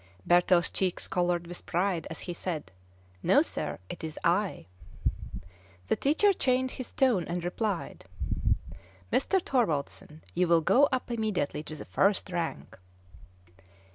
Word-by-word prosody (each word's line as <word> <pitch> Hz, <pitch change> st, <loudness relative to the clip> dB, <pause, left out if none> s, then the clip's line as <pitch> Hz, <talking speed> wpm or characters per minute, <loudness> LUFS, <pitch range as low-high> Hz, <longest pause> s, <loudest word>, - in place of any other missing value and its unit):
Bertel's 175 Hz, 0 st, +4 dB
cheeks 185 Hz, -2 st, -1 dB
colored 175 Hz, -1 st, 0 dB
with 175 Hz, +1 st, -9 dB
pride 175 Hz, -1 st, 0 dB
as 160 Hz, -, -7 dB
he 175 Hz, -, -4 dB
said, 165 Hz, -, -4 dB, 0.5 s
"No, -, -, +5 dB
sir; -, -, -4 dB
it -, -, -8 dB
is 160 Hz, -1 st, -5 dB
I." 180 Hz, -, +1 dB, 1.2 s
The -, -, +4 dB
teacher 325 Hz, +9 st, +3 dB
changed 260 Hz, -5 st, 0 dB
his 255 Hz, -, -6 dB
tone, 250 Hz, -10 st, +3 dB
and 175 Hz, 0 st, -3 dB
replied, 190 Hz, +1 st, -2 dB, 1.1 s
"Mr. 380 Hz, +8 st, +3 dB
Thorwaldsen, 160 Hz, -, -1 dB
you 180 Hz, +1 st, +2 dB
will 170 Hz, -1 st, +5 dB
go 275 Hz, -, +5 dB
up 255 Hz, -2 st, -1 dB
immediately 215 Hz, -11 st, -1 dB
to 155 Hz, 0 st, -8 dB
the 150 Hz, -, -8 dB
first 195 Hz, -1 st, +1 dB
rank." 165 Hz, -, -4 dB
180 Hz, 135 wpm, -29 LUFS, 170-230 Hz, 1.2 s, No